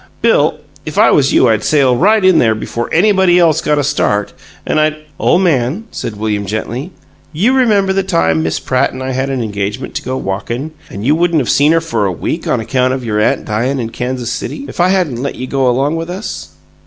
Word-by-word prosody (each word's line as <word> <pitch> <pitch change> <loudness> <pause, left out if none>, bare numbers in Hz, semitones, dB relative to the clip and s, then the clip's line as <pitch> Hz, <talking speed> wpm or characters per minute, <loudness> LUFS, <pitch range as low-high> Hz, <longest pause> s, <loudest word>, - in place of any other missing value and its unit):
Bill, - - +3 0.3
if - - -7
I - - +5
was 140 -1 +3
you 130 - +4
I'd 110 -2 +1
sail 135 -5 +3
right 205 - +3
in 185 -2 +5
there 110 -2 +3
before 115 +2 -4
anybody 190 0 +3
else 165 -4 +3
got 150 - +1
a 145 - +1
start, 105 -6 0 0.3
and - - +1
I'd 155 0 +2 0.2
" - - -33
"Ole - - +3
man," 165 - +1
said 110 - -5
William, 105 -1 -2
gently, 115 - -4 0.4
"you 200 - +1
remember 210 -7 +2
the 195 - +1
time 80 - +1
Miss 80 0 -1
Pratt 130 -1 0
and 130 0 -7
I 130 - -3
had 130 +1 -2
an 130 -3 -2
engagement 105 +3 -4
to - - -3
go 130 0 -4
walkin', 120 +9 -4 0.2
and 100 +3 -7
you 145 - +4
wouldn't 170 0 +2
of 125 - 0
seen 145 +2 +4
her 165 0 +3
for 115 -11 -1
a - - -1
week 85 - -4
on - - +1
account 130 +3 0
of 130 -2 -6
your 105 -2 -1
aunt 105 - +1
dyin' 120 +6 -1
in 115 -2 -4
Kansas 125 0 -3
City, 275 - -5
if - - -10
I 175 +1 +4
hadn't 175 -11 0
let 140 - -3
you 130 - -5
go 130 -1 +1
along 140 +6 0
with 165 +1 -5
us? 190 +4 -6
130 Hz, 230 wpm, -14 LUFS, 115-165 Hz, 0.4 s, I